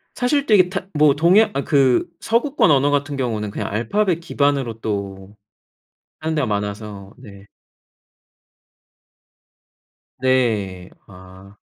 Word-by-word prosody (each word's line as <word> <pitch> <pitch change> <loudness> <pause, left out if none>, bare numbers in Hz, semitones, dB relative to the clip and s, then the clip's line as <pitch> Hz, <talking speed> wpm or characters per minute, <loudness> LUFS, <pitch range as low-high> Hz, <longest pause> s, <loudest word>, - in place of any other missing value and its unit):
사실 275 +3 0
되게 185 -5 +4
타 185 - -5
뭐 150 -2 +4
동양 180 +8 +4
아 140 +1 -2
그 135 +2 +2
서구권 235 - +1
언어 140 0 +3
같은 145 0 -1
경우는 110 -5 -3
그냥 - - -4
알파벳 170 - 0
기반으로 140 -8 -1
또 100 -1 -5 0.9
하는 160 0 -2
데가 145 -5 0
많아서. 105 -1 -5
네. 100 -5 -14 2.7
네. 110 -9 0 0.2
아. 95 +1 -15
130 Hz, 205 characters per minute, -20 LUFS, 100-155 Hz, 2.7 s, 되게